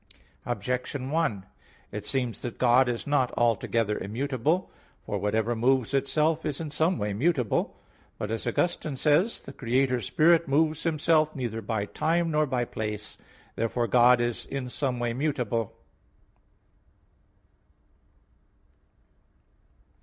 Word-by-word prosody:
Objection 125 +2 -3
1: 135 - 0 0.5
It 105 - -5
seems 125 -4 -1
that 120 -3 -5
God 125 +1 +4
is 120 -1 -3
not 145 -4 +1
altogether 115 -2 +1
immutable. 135 - -1 0.3
For - - -2
whatever 110 +3 0
moves 130 +2 +1
itself 150 +4 +1
is 150 -3 -3
in 160 -3 -5
some 160 +4 +1
way 105 0 -2
mutable. 130 0 0 0.4
But, 105 - -4
as 115 +1 -3
Augustine 155 +3 -1
says 145 +3 +3
(Gen. - - +6
ad - - +4
lit, 215 - -3
viii, - - -7
20), - - -22
"The 135 - -10 0.3
Creator 125 -1 0
Spirit 165 +3 +3
moves 155 +2 +2
Himself 155 -1 +2
neither 120 -4 -3
by 110 -1 -2
time, 165 +8 0
nor 150 0 +2
by 125 -2 0
place." 105 -2 -5 0.4
Therefore 115 +1 0
God 120 +2 +5
is 120 -1 -2
in 135 -2 -4
some 130 -1 -2
way 120 -1 -1
mutable. 120 -6 -1
130 Hz, 140 wpm, -27 LUFS, 115-155 Hz, 0.5 s, Gen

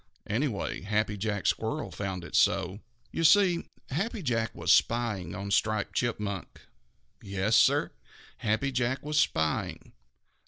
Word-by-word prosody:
Anyway, 115 0 -2
Happy 105 +1 0
Jack 100 0 -3
Squirrel 150 +8 -1
found 95 -3 -4
it 85 +3 -7
so. 100 -1 +2 0.3
You 165 - -2
see, 175 +1 +5 0.2
Happy 200 - -2
Jack 115 -4 -1
was - - +3
spying 105 -8 +1
on 100 +1 -5
Striped 110 0 +1
Chipmunk. 105 -5 -3 0.6
Yes, 100 +3 0
Sir, - - +4 0.5
Happy 110 +5 0
Jack 130 +1 -1
was 150 0 +1
spying. 80 - -1
110 Hz, 125 wpm, -29 LUFS, 100-130 Hz, 0.6 s, see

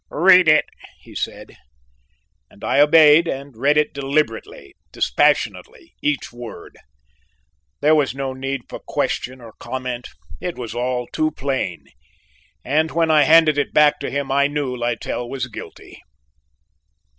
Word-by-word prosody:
"Read 180 +2 +5
it," 155 0 +5 0.4
he - - -15
said, - - -6 0.9
and - - -19
I - - +1
obeyed, 155 +2 +6
and 135 -3 -6
read 140 +6 +2
it 150 - +1
deliberately, 150 - -3 0.2
dispassionately, 440 -7 0
each 145 -4 -2
word. 120 -1 -10 1.1
There 150 +2 +4
was 145 -4 +1
no 135 -1 -4
need 135 0 -4
for - - -8
question 130 +1 -3
or 115 -3 -13
comment, 125 -2 -5 0.3
it 180 - -5
was 115 -3 -6
all 125 +1 -2
too 155 +5 -1
plain, 135 - -4 0.8
and 155 +2 +1
when 165 -1 +1
I 150 -2 +5
handed 155 -2 +5
it 145 - -3
back 150 -1 +4
to 140 - -4
him 140 -1 -3
I 140 +1 +3
knew 145 -3 -3
Littell 120 0 -3
was 130 -1 -3
guilty. 120 - -11
140 Hz, 140 wpm, -20 LUFS, 130-155 Hz, 1.1 s, obeyed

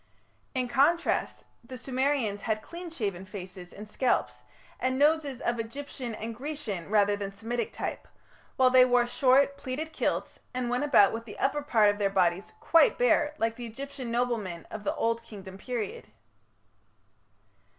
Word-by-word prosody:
In 255 -1 0
contrast, 295 +7 +2 0.2
the 255 +2 -9
Sumerians 255 -5 0
had 215 -1 -1
clean 345 +1 -8
shaven 200 - -3
faces 185 -2 -9
and 210 +2 -10
scalps, 245 +4 0 0.4
and 260 0 0
noses 290 -3 +2
of 235 0 -1
Egyptian 245 0 -5
and 225 +1 -5
Grecian 250 - -5
rather 205 -1 +4
than 200 -1 -4
Semitic 225 +3 -3
type, - - -5 0.5
while 255 -1 +4
they 255 0 +8
wore 245 -1 +4
short, 270 +3 +3
pleated 300 +5 -5
kilts, - - -2 0.2
and 250 -1 -1
went 250 +3 +1
about 235 -9 +5
with 230 +1 -5
the 210 - -10
upper 285 +2 +1
part 220 -7 +4
of 205 - -7
their 200 -1 +2
bodies 185 -1 +1
quite 330 -6 +4
bare 305 -12 +3
like 225 0 0
the 240 -1 -6
Egyptian 265 +2 -7
noblemen 230 -8 -1
of 215 -1 -6
the - - -1
Old 230 0 0
Kingdom 195 -4 -11
period. 250 - -4
240 Hz, 160 wpm, -28 LUFS, 210-275 Hz, 0.5 s, they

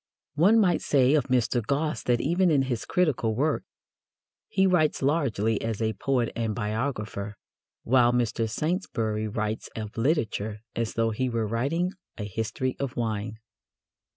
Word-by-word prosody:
One 190 +10 +5
might 180 -5 +3
say 135 -1 +3
of 150 -5 +3
Mr. 125 -2 +1
Gosse 145 +6 -1
that 120 -1 +2
even 175 +7 +2
in 145 -4 +3
his 125 -4 -3
critical 145 - +1
work 150 +5 +1 0.8
he 190 0 +2
writes 165 -7 +2
largely 120 -8 +1
as 115 -2 -2
a 110 -1 0
poet 125 -2 0
and 115 -2 -1
biographer, 105 -2 -3 0.5
while 120 0 +4
Mr. 115 -2 0
Saintsbury 110 - -1
writes 110 +1 -3
of 110 -1 -6
literature 110 - 0
as 115 -1 -2
though 115 0 +1
he 130 +4 -1
were 115 -2 -1
writing 140 - 0 0.3
a 105 - -4
history 110 +5 -2
of 135 -3 -3
wine. 110 -2 -2
120 Hz, 150 wpm, -27 LUFS, 110-145 Hz, 0.8 s, One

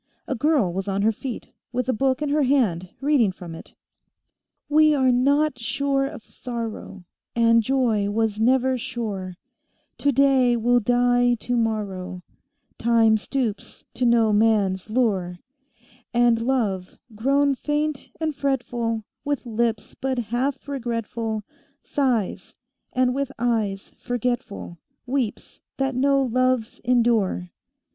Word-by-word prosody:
A - - -1
girl 265 - +2
was 190 +2 -3
on 195 0 0
her 220 - +4
feet, 240 +2 -7 0.2
with 250 0 -2
a 260 - +2
book 265 +4 +1
in 295 - -1
her 300 +1 +2
hand, 225 -11 +1
reading 270 -8 +3
from 175 -2 -9
it: 165 - -12 0.9
"We 305 0 +5
are 260 -2 +3
not 280 +2 +2
sure 275 +3 0
of 280 -6 -10
sorrow; 230 -5 -6 0.3
And 230 0 +5
joy 225 -4 +1
was 215 0 0
never 255 +2 +2
sure; 210 -7 -4 0.6
Today 270 -3 +3
will 245 +2 +3
die 245 +1 +3
tomorrow; 210 -6 -2 0.6
Time 230 -1 +4
stoops 220 0 -3
to 245 0 +1
no 230 -2 +4
man's 205 -3 +2
lure; 200 -7 0 0.8
And 240 -1 +4
love, 220 -7 -1 0.2
grown 275 +6 +2
faint 295 +1 -2
and 315 -2 -1
fretful 240 -5 -1 0.2
With 285 -2 -2
lips 230 -1 -1
but 265 -1 -3
half 245 +5 -2
regretful 230 -4 -3 0.4
Sighs, 250 -8 -1 0.4
and 255 -1 +2
with 275 0 -2
eyes 220 -5 -1
forgetful 245 -7 -3 0.3
Weeps 255 -4 -3 0.2
that 270 0 0
no 275 +2 +3
loves 255 -2 0
endure." 230 -7 +1
240 Hz, 120 wpm, -24 LUFS, 220-265 Hz, 0.9 s, We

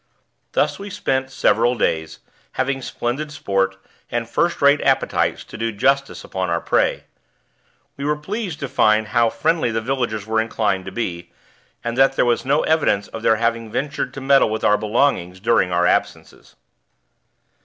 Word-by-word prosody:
Thus - - +1
we 200 +1 -7
spent 135 -10 -1
several 120 -2 +2
days, 80 -4 -1 0.3
having 135 +1 -1
splendid 130 +5 -3
sport, 95 -8 -1 0.3
and 120 -1 -2
first 170 +8 0
rate 140 +1 +4
appetites - - +1
to - - -11
do 115 0 -1
justice 135 +6 0
upon 95 -1 -3
our 85 0 +1
prey. - - +1 0.9
We 140 - -4
were 150 +1 +1
pleased 190 +2 -5
to 140 - -2
find 110 -3 +2
how 115 +2 +3
friendly 160 -1 0
the 115 0 -1
villagers 115 -3 -2
were 110 0 +1
inclined 105 -4 -1
to 95 - -6
be, 85 -5 -4 0.5
and 120 0 -3
that 135 0 +5
there - - +2
was 120 -1 +1
no 140 +3 +2
evidence 155 -11 +1
of 115 - -7
their 110 - +3
having 115 0 -1
ventured 140 +5 -2
to 135 - -6
meddle 135 -2 +4
with 110 0 -3
our 105 - +5
belongings 105 -4 0
during 105 -3 +2
our 90 0 +2
absences. - - -2
115 Hz, 165 wpm, -21 LUFS, 105-140 Hz, 0.9 s, that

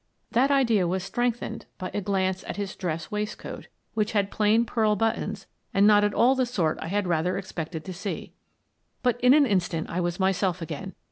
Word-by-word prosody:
That 255 +4 +3
idea 235 -10 +3
was 185 +1 -1
strengthened 230 +2 -2
by 185 - -5
a 205 - -1
glance 190 -1 0
at - - -5
his 200 -2 -4
dress 165 -3 -4
waistcoat 210 0 -5 0.3
which 215 0 0
had 200 -2 +1
plain 220 +2 +3
pearl 215 -2 +2
buttons 225 +2 -1 0.3
and 200 +1 +5
not 205 -1 +6
at 205 0 +1
all 250 +3 +5
the 260 -2 +1
sort 170 -10 0
I - - -4
had 200 +3 0
rather 175 +1 0
expected 165 -4 -5
to 185 - -5
see. 195 +3 -5 0.7
But 245 -1 +1
in 250 +2 +7
an 300 -2 +6
instant 180 -7 0
I 175 - -1
was 175 +1 -2
myself 190 -1 +1
again. 165 +3 -6
200 Hz, 195 wpm, -26 LUFS, 180-225 Hz, 0.7 s, in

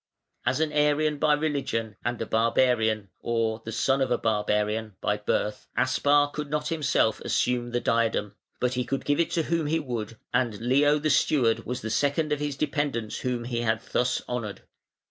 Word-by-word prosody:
As - - +2
an 160 -1 +1
Arian 150 0 +2
by 150 - +4
religion, 140 -8 -2
and 120 -1 -2
a 115 - -2
barbarian, 110 -2 +2
or 115 -1 -1
the 115 - -6
son 135 +4 +1
of 130 - +1
a - - +2
barbarian, 105 0 0
by 105 - 0
birth, 105 0 -2
Aspar 145 0 +3
could 150 0 -5
not 150 0 -1
himself 145 -8 +1
assume 120 -1 0
the 120 0 0
diadem, 115 -3 +1 0.3
but 125 0 +1
he 125 0 0
could 135 +3 -3
give 145 +1 +1
it 170 - +2
to 165 - 0
whom 165 -1 0
he 160 +2 +1
would, 115 -6 -5 0.2
and 120 -4 +1
Leo 140 +5 +3
the 155 0 0
steward 125 -5 +2
was 125 +1 -3
the 110 - -4
second 145 +4 +1
of 150 - +1
his 145 -2 -3
dependants 140 -7 -1
whom 125 -2 -2
he 120 -1 -2
had 110 -1 +1
thus 125 0 +1
honoured. 115 -5 -4
125 Hz, 185 wpm, -26 LUFS, 115-145 Hz, 0.3 s, by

